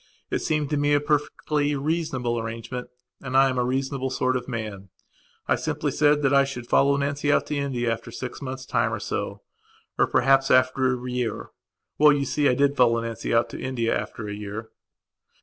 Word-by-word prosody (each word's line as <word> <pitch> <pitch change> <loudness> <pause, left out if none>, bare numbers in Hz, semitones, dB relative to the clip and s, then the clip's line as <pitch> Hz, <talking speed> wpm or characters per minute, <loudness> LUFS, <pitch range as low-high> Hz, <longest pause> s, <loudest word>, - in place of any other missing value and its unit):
It - - +1
seemed 150 -2 -1
to 150 - +1
me 145 0 +3
a - - +4
perfectly 150 0 0
reasonable 140 -5 -1
arrangement 115 +2 -5 0.3
and 130 -1 -1
I 135 0 +6
am 130 -1 -1
a - - +2
reasonable 130 +1 -1
sort 130 0 0
of 125 -1 -3
man. 105 -5 -5 0.6
I - - +3
simply - - -2
said 150 0 +3
that 135 0 +3
I 140 0 +6
should 135 -3 -5
follow 140 +3 +3
Nancy 140 +1 0
out - - +2
to 150 - -3
India 125 -5 -1
after 115 - -8
six 125 +2 -7
months' 130 -1 -6
time - - +1
or - - -2
so. - - -4 0.6
Or, - - +4
perhaps, 135 +1 +3
after 130 -1 +2
a 125 - -4
year. 125 -2 -3 0.5
Well, 150 0 +7
you 140 -1 0
see, 145 +2 +2
I 125 - +2
did 140 +1 +2
follow 120 -3 +4
Nancy 115 -1 -4
out 115 0 +3
to - - -7
India 125 -3 -1
after 105 - -5
a 105 - -4
year.... 105 +2 -6
130 Hz, 200 wpm, -25 LUFS, 120-140 Hz, 0.6 s, Well